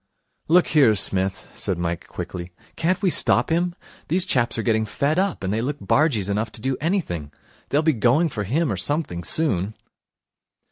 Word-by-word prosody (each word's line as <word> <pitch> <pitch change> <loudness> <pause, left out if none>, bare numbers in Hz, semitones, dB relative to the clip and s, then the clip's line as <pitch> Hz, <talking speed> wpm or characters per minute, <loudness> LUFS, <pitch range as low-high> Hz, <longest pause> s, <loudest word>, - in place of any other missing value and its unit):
'Look 175 +2 +5
here, 135 -8 +5
Smith,' 95 -1 0
said 95 - -2
Mike 85 -1 -3
quickly, 85 -1 -6 0.3
'can't 175 +3 0
we 185 - +3
stop - - +2
him? 175 +1 +1 0.3
These 180 +3 +3
chaps 120 -11 +1
are 115 - -1
getting 110 -1 +2
fed 145 +9 0
up, 195 - -1
and 95 +1 -1
they 110 - 0
look 140 +4 -2
bargees 135 - +1
enough 105 +2 -1
to - - -2
do 130 +2 -1
anything. 145 - -2 0.4
They'll 145 +3 +2
be 160 -1 +3
going 130 +8 +2
for 105 -7 -4
him 145 - 0
or 100 - -2
something 95 - -2
soon.' 110 - +1
125 Hz, 180 wpm, -23 LUFS, 100-160 Hz, 0.4 s, Look